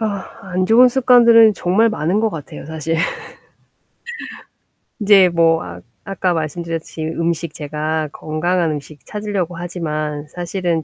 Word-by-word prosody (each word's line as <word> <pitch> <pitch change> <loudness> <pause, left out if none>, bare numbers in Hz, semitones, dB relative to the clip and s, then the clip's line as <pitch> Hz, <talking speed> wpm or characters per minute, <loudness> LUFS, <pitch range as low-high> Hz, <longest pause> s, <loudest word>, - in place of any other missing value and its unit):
아 205 -3 -2 0.3
안 185 +1 0
좋은 245 +4 +6
습관들은 235 -3 +6
정말 195 +6 +2
많은 190 0 0
것 225 - +2
같아요. 155 -4 -8
사실. 160 +1 -3 2.0
인제 200 -3 +6
뭐 165 -1 +3
아 85 0 -9 0.2
아까 190 -2 -1
말씀드렸듯이 165 0 -4
음식 165 0 -2
제가 155 +1 -3
건강한 165 +3 -1
음식 145 -2 -8
찾으려고 200 -5 -3
하지만 155 -4 -4
사실은 175 -1 -2
170 Hz, 270 characters per minute, -18 LUFS, 155-195 Hz, 2.0 s, 좋은